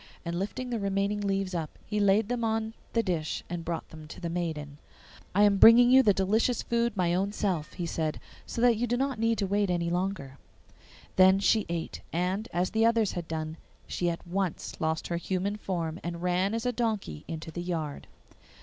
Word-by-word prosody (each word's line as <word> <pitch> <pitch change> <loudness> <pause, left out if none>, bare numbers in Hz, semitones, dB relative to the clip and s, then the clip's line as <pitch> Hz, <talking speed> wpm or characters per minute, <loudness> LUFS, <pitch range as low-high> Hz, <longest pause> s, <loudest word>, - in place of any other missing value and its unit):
And 170 +1 -2
lifting 245 +6 -4
the 235 - -1
remaining 200 +1 0
leaves 195 -2 -1
up, 165 -3 -4
he 210 0 -2
laid 200 +1 +3
them 245 0 -2
on 220 0 -1 0.2
the 230 - +2
dish 165 -5 -2
and 175 -1 -3
brought 165 0 -4
them 155 -1 -11
to - - -10
the 170 -2 -4
maiden. 155 -4 -4 0.6
'I 205 - +5
am 205 -1 +5
bringing 240 +4 +8
you 265 +1 +8
the 215 -5 +5
delicious 215 +5 +1
food 235 -2 0
my 175 -2 +2
own 195 +3 0
self,' 185 -7 -2
he 175 - -4
said, 160 -2 -2 0.3
'so 230 - -4
that 240 -2 +5
you 245 +2 0
need 245 +1 0
not 270 -2 -1 0.3
wait 205 -1 +2
any 170 -1 0
longer.' 175 -8 -3 0.8
Then 190 +1 +7
she 210 +1 +2
ate, 170 -1 -4
and, 185 +6 -1
as 180 +1 0
the 220 +1 +2
others 230 -3 +3
had 175 -2 -5
done, 160 0 -4 0.3
she 175 - -1
at 170 +1 -5
once 185 0 -2
lost 160 0 -1
her 170 - 0
human 190 +3 -2
form, 175 -5 -3
and 170 0 -5
ran 180 +4 +1
as 230 +1 -3
a 250 - +2
donkey 220 - -2
into 160 0 -6
the 175 - -5
yard. 165 -5 -4
190 Hz, 200 wpm, -29 LUFS, 170-215 Hz, 0.8 s, bringing